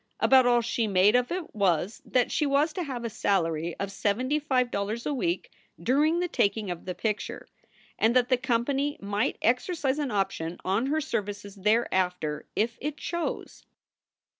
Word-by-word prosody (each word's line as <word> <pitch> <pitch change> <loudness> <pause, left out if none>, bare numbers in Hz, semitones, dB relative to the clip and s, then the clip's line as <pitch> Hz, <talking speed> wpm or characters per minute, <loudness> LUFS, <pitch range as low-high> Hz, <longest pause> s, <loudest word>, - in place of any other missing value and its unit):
About 260 -2 +5
all 240 -1 +4
she 230 -1 0
made 200 +3 +4
of 250 0 +2
it 355 -2 -4
was 195 - 0
that 250 -1 +1
she 300 - +1
was 290 +3 +2
to 360 - -3
have 260 -7 -4
a - - -1
salary 165 -5 0
of 195 0 -3
seventy 245 +9 0
five 255 -4 +1
dollars 210 +4 -2
a 295 - 0
week 335 +6 -2 0.3
during 300 +6 +2
the 355 - 0
taking 205 - 0
of 175 - -7
the 180 -1 -4
picture, 210 +2 -3 0.5
and 225 +3 +3
that 250 0 +3
the 255 - +5
company 270 +3 0
might 205 +2 -1
exercise 270 - +1
an 290 -3 -1
option 195 -5 -2
on 200 +7 +1
her 310 +3 +1
services 205 -7 -4
thereafter 185 -7 0
if 230 +2 0
it 300 +1 -3
chose. 340 +4 -4
235 Hz, 170 wpm, -27 LUFS, 200-275 Hz, 0.5 s, About